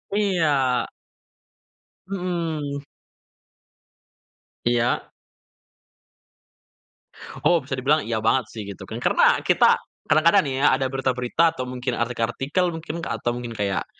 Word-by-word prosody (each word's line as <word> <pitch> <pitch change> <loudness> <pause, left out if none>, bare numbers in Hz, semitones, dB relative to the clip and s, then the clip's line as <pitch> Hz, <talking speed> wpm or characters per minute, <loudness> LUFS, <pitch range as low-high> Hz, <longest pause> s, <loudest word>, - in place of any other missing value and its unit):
Iya. 155 -11 +1 1.2
Mhm. 165 -7 -3 1.8
Iya. 120 0 +2 2.4
Oh 175 - +5
bisa - - -6
dibilang 145 +4 +2
iya 115 -1 -1
banget 120 +3 +2
sih 110 - -6
gitu 100 - -8
kan, - - -5
karena - - +4
kita - - +4 0.3
kadang-kadang 165 +6 +5
nih 140 -5 -3
ya - - +6
ada 135 -1 0
berita-berita 130 +4 +1
atau 130 -5 -5
mungkin 125 0 -3
artikel-artikel 120 +8 -1
mungkin, 165 0 -6
atau 115 +1 -2
mungkin 120 -1 -4
kayak 100 -3 -1
135 Hz, 105 wpm, -23 LUFS, 120-160 Hz, 2.4 s, ya